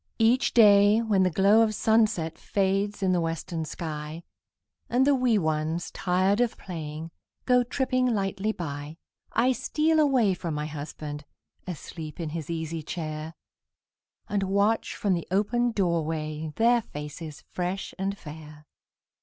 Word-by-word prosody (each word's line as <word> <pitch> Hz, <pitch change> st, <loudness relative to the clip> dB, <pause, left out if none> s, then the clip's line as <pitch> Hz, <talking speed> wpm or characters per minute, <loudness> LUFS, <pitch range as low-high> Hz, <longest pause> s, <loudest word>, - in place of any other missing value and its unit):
Each 230 Hz, +3 st, +3 dB
day, 205 Hz, -1 st, +6 dB
when 210 Hz, -4 st, +2 dB
the 185 Hz, -, +4 dB
glow 200 Hz, +5 st, +5 dB
of 215 Hz, -1 st, +2 dB
sunset 215 Hz, -8 st, +2 dB
Fades 200 Hz, +1 st, -1 dB
in 185 Hz, -, +3 dB
the 180 Hz, -1 st, +2 dB
western 165 Hz, 0 st, -3 dB
sky, 155 Hz, 0 st, -6 dB, 0.7 s
And 255 Hz, +2 st, +3 dB
the 285 Hz, -, +5 dB
wee 250 Hz, -4 st, +3 dB
ones, 160 Hz, -1 st, -1 dB
tired 190 Hz, +4 st, +1 dB
of 240 Hz, -2 st, 0 dB
playing, 160 Hz, -2 st, -6 dB, 0.3 s
Go 250 Hz, -1 st, +5 dB
tripping 255 Hz, 0 st, 0 dB
lightly 200 Hz, -2 st, 0 dB
by, 150 Hz, -4 st, -6 dB, 0.4 s
I 245 Hz, +3 st, +3 dB
steal 310 Hz, +5 st, +1 dB
away 260 Hz, -9 st, +4 dB
from 170 Hz, -3 st, -4 dB
my 150 Hz, 0 st, -2 dB
husband, 150 Hz, 0 st, -6 dB, 0.4 s
Asleep 160 Hz, -2 st, -7 dB
in 165 Hz, -2 st, -3 dB
his 160 Hz, -1 st, -5 dB
easy 165 Hz, -1 st, -3 dB
chair, 155 Hz, 0 st, -5 dB, 0.9 s
And 205 Hz, -1 st, 0 dB
watch 200 Hz, +3 st, +1 dB
from 200 Hz, -2 st, +1 dB
the 170 Hz, -2 st, -2 dB
open 235 Hz, +6 st, +1 dB
door 175 Hz, -6 st, +1 dB
way 155 Hz, 0 st, -4 dB
Their 235 Hz, +1 st, +4 dB
faces 150 Hz, -2 st, -8 dB
fresh 180 Hz, +2 st, -3 dB
and 195 Hz, +1 st, -2 dB
fair. 150 Hz, -1 st, -11 dB
185 Hz, 145 wpm, -27 LUFS, 160-220 Hz, 0.9 s, day